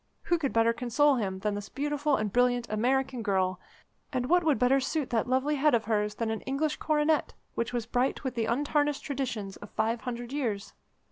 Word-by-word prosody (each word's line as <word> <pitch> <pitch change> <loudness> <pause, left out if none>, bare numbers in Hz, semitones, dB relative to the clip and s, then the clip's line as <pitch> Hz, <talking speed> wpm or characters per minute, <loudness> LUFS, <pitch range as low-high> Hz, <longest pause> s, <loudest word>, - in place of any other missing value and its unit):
Who 345 - +1
could 275 -4 -1
better 230 0 +3
console 260 +4 +2
him 195 -4 -2
than 210 0 0
this 205 0 -5
beautiful 295 +1 0
and 210 -4 -2
brilliant 245 -1 +2
American 255 +3 0
girl, 190 -4 0 0.5
and 255 -3 -1
what 355 +6 +3
would 310 -5 +3
better 250 +4 +4
suit 275 0 -2
that 235 0 +1
lovely 270 +4 +1
head 295 -1 +4
of 225 - 0
hers 210 -1 0
than 225 0 -1
an 220 - -3
English 295 +3 -1
coronet 305 0 +1 0.2
which 235 - -2
was 240 -2 -2
bright 250 +5 0
with 260 - -2
the 230 -2 -1
untarnished 290 +3 +1
traditions 245 -9 -3
of 205 - -11
five 225 +2 -1
hundred 245 0 -5
years? 225 -8 -2
245 Hz, 200 wpm, -29 LUFS, 220-285 Hz, 0.5 s, better